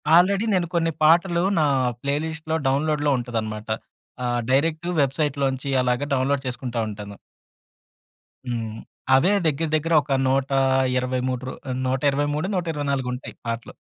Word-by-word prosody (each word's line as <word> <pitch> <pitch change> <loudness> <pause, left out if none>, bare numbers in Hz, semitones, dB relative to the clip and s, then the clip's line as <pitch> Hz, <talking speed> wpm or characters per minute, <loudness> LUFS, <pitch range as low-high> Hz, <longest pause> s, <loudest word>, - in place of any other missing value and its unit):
Already 195 +5 +4
నేను 175 -2 +1
కొన్ని 165 -1 +2
పాటలు 170 +2 +4 0.2
నా 150 - +3 0.4
ప్లేలిస్ట్‌లో 160 +3 -2
డౌన్‌లోడ్‌లో 145 +1 +1
ఉంటదన్నమాట. 110 -3 -4 0.6
ఆహ్, 120 0 0
డైరెక్ట్ 160 +5 +1
వెబ్‌సైట్‌లో 140 0 0
నుంచి 135 +1 -4
అలాగా 125 +3 0
డౌన్‌లోడ్ 135 +1 0
చేసుకుంటా 125 -1 -3
ఉంటాను. 100 -1 -8 1.3
హ్మ్. 115 -2 -3 0.4
అవే 175 +10 +4
దగ్గర 155 +1 0
దగ్గర 165 +2 0
ఒక 140 -1 -4
123 130 -1 +1
రు - - -5 0.3
నూట 130 +1 0
ఇరవై 145 +1 0
మూడో, 155 +5 -1
నూట 180 -2 0
ఇరవై 145 -1 -3
నాలుగొ 130 -2 -1
ఉంటాయి 125 - -8
పాటలు. 115 0 -4
135 Hz, 135 wpm, -23 LUFS, 125-155 Hz, 1.3 s, Already